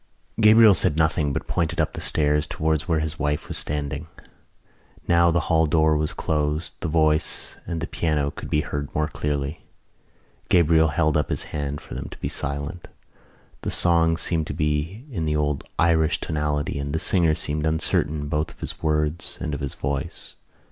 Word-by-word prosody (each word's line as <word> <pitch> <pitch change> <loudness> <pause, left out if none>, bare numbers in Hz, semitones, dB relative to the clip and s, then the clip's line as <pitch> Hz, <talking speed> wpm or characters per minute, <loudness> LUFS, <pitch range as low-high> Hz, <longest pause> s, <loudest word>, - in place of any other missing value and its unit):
Gabriel 110 -1 +7
said 80 -3 +2
nothing 80 -2 +2
but - - -3
pointed 85 0 -1
up 80 - +1
the - - -6
stairs 75 -1 +2
towards 80 +1 -1
where 80 -3 +1
his 80 0 -4
wife 75 0 -1
was - - -5
standing. 75 +1 -3 1.0
Now 85 0 +4
that 85 - +3
the 85 - +3
hall 80 0 +2
door 80 0 +3
was 75 0 0
closed 75 +1 -2
the - - -3
voice 80 -1 +1
and 85 -1 -3
the - - -1
piano 75 -4 -1
could - - -8
be 75 - +2
heard 70 -1 -5
more 75 0 +1
clearly. 75 +1 -3 0.9
Gabriel 80 -2 +4
held 75 +1 +1
up 75 - +1
his - - +1
hand 70 0 -3
for - - -10
them - - -5
to - - -11
be - - -3
silent. 70 +5 -3 0.7
The - - -3
song 80 -1 +3
seemed 80 -1 -1
to - - -5
be 75 - -2
in 85 -9 -2
the 75 0 0
old 75 -2 -1
Irish 80 -1 +3
tonality 75 -3 -2
and 70 0 -4
the 80 - 0
singer 85 -3 +3
seemed 75 0 -1
uncertain 75 -1 0
both 75 +1 -1
of - - -17
his - - -7
words 75 0 -1
and 75 - -3
of - - -3
his 70 -2 -4
voice. 70 0 -4
75 Hz, 185 wpm, -24 LUFS, 75-80 Hz, 1.0 s, Gabriel